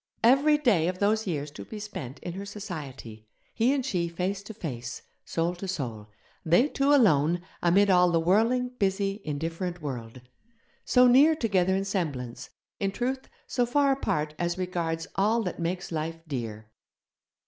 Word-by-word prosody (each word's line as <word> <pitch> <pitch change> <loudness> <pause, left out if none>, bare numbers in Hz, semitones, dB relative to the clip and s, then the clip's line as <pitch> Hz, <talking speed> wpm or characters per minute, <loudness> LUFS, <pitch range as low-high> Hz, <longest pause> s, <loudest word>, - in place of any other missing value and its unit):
Every 275 +6 +5
day 215 - +3
of 180 0 -2
those 210 +2 +1
years 150 -4 -3
to - - -9
be 215 - -8
spent 150 - -7
in 175 - -4
her 195 +2 -6
society; 145 - -8 0.3
he 235 +3 +2
and 275 -3 0
she 180 -9 0
face 185 +4 -2
to 210 +2 -9
face, 125 - -6 0.2
soul 170 +1 -1
to 195 - -6
soul; 120 - -4 0.4
they 175 - +4
two 275 0 +1
alone 175 - +4 0.2
amid 195 +3 +4
all 180 -1 +5
the 170 -1 +2
whirling, 225 +9 +2
busy, 195 +1 0
indifferent 165 +4 -3
world. 125 -5 -6 0.6
So 250 0 +5
near 275 +6 +6
together 190 - +1
in 195 +1 -1
semblance; 135 - -3 0.3
in 195 -1 0
truth, 260 +5 -3 0.2
so 245 - 0
far 280 +3 +3
apart 150 - -1
as 175 0 -1
regards 170 -3 -2
all 220 +4 +2
that 180 - -4
makes 175 +2 -3
life 165 +1 -4
dear. 110 -6 -5
180 Hz, 160 wpm, -27 LUFS, 155-215 Hz, 0.6 s, near